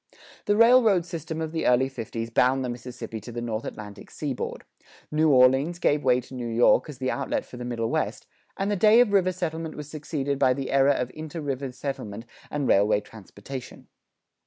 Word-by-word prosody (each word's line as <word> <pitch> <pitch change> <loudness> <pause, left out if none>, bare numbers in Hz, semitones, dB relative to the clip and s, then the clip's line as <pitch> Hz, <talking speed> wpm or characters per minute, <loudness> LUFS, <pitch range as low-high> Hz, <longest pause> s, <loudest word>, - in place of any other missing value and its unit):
The 205 -1 +2
railroad 230 -6 +5
system 165 -2 -5
of 160 -1 -3
the 160 -1 -1
early 125 +2 +4
fifties 115 -3 -6
bound 130 +3 +2
the - - -3
Mississippi 120 -2 -7
to 120 - -9
the 120 - -5
North 115 -2 -3
Atlantic 105 -1 -9
seaboard; 140 -5 -4 0.5
New 155 +1 +3
Orleans 135 +5 +4
gave 150 -4 +1
way 125 -1 +4
to 125 - -15
New 125 -2 -4
York 115 +6 +3
as 145 - -8
the 130 0 -1
outlet 140 - -2
for 125 - -11
the 120 - -6
Middle 115 -2 -2
West, - - -2 0.3
and 195 +1 -1
the - - +1
day 215 +4 +6
of 235 -4 +4
river 185 -2 +3
settlement 165 -3 -4
was 150 0 -8
succeeded 145 -2 -3
by 130 -1 +4
the 135 0 -4
era 135 +1 +4
of 125 -2 -3
inter 155 +2 -7
river 135 -2 -3
settlement 125 -5 -6 0.2
and 145 -3 -2
railway 100 +1 +4
transportation. 110 +5 -10
135 Hz, 195 wpm, -26 LUFS, 120-160 Hz, 0.5 s, day